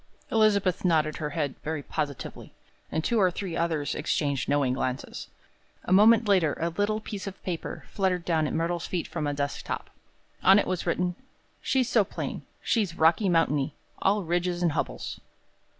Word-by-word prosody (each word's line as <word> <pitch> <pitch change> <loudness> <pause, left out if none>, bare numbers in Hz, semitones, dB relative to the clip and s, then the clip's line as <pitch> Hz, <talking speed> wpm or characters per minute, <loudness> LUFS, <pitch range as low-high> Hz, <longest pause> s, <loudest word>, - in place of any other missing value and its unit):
Elizabeth 205 -5 +3
nodded 155 -4 +2
her 150 - -3
head 150 -4 -2
very 155 -1 -3
positively, 140 -2 -5 0.4
and 160 - -1
two 235 +4 +1
or 185 - +5
three 180 -1 -4
others 160 -4 0
exchanged 145 -3 -1
knowing 140 -3 +2
glances. 130 0 -3 0.6
A 185 - 0
moment 220 +3 +6
later 185 -7 +3
a 170 - 0
little 205 +5 0
piece 205 -2 -6
of 195 - -7
paper 175 -3 -4
fluttered 185 -3 0
down 160 -3 +2
at - - -4
Myrtle's 170 +1 -1
feet 175 -3 -2
from 155 -3 -3
a 145 - 0
desk 140 0 -2
top. - - -5 0.5
On 195 - +7
it - - +3
was 180 -1 -2
written: 180 +1 +1 0.5
"She's 260 -3 +1
so 225 -4 +4
plain. - - -5 0.2
She's 200 -7 0
Rocky 170 +5 +4
Mountainy 150 -5 +2 0.3
all 205 +1 +2
ridges 175 +1 0
and 170 - +3
hubbles." - - -3
170 Hz, 170 wpm, -27 LUFS, 155-195 Hz, 0.6 s, On